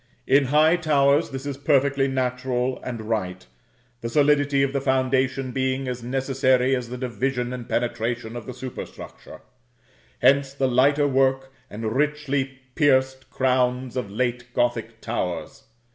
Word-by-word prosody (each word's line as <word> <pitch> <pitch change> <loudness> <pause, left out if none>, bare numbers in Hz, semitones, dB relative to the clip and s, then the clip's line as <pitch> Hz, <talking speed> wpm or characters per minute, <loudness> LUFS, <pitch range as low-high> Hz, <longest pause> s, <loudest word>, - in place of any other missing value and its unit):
In 140 0 +4
high 155 +5 +4
towers 145 -2 +3
this 135 0 -6
is 140 -2 -4
perfectly 140 -1 +2
natural 125 -1 -1
and 120 -3 -5
right, 95 - -3 0.6
the 115 - -3
solidity 145 0 +3
of 135 0 -1
the 140 - 0
foundation 130 0 0
being 130 +1 -1
as 125 -1 -4
necessary 130 +1 +1
as 125 -2 -4
the 125 - -5
division 125 +1 -2
and 125 -2 -7
penetration 115 -1 -2
of 120 -2 -7
the 130 - -5
superstructure; 130 -1 -9 0.8
hence 135 +2 +3
the 135 -1 +1
lighter 140 +4 +3
work 135 0 +1 0.2
and 110 +1 -4
richly 140 -2 -1
pierced 130 -2 +2
crowns 125 -1 0
of 125 -6 -3
late 120 +3 -2
Gothic 115 -2 -1
towers. 90 -7 -4
130 Hz, 140 wpm, -24 LUFS, 125-135 Hz, 0.8 s, In